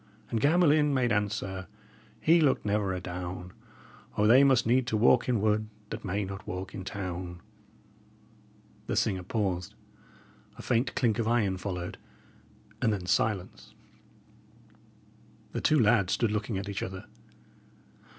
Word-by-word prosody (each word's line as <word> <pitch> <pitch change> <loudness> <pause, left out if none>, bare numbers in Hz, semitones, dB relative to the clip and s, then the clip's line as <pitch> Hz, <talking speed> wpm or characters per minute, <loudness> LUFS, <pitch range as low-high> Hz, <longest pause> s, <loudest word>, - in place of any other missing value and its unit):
And 115 -2 0
Gamelyn 150 -2 +4
made 125 -2 +1
answer 100 -2 -2 0.5
he 165 +1 +4
looked 140 -7 +2
never 105 -1 0
adown: 90 0 -6 0.6
'O, 105 - +3
they 125 +5 +7
must 130 -3 +4
need 120 +2 +2
to 110 - 0
walk 120 +3 +4
in 120 -3 +2
wood 110 0 +1 0.2
that - - -5
may 100 +1 -2
not 95 +1 -8
walk 90 +1 -5
in 95 - -6
town!'" 90 -2 -5 1.5
The - - -1
singer 95 -1 +1
paused, 90 -2 -2 0.8
a - - -9
faint 120 +2 0
clink 115 -3 +1
of 115 - 0
iron 110 -5 +1
followed, 90 -2 -5 0.8
and 115 - +3
then 95 -4 -3
silence. 95 +1 -1 1.8
The - - -3
two 155 - +3
lads 105 -5 +3
stood 115 -3 +1
looking 105 0 -2
at 100 +2 -4
each 100 -2 -4
other. 95 0 -6
105 Hz, 140 wpm, -29 LUFS, 95-120 Hz, 1.8 s, they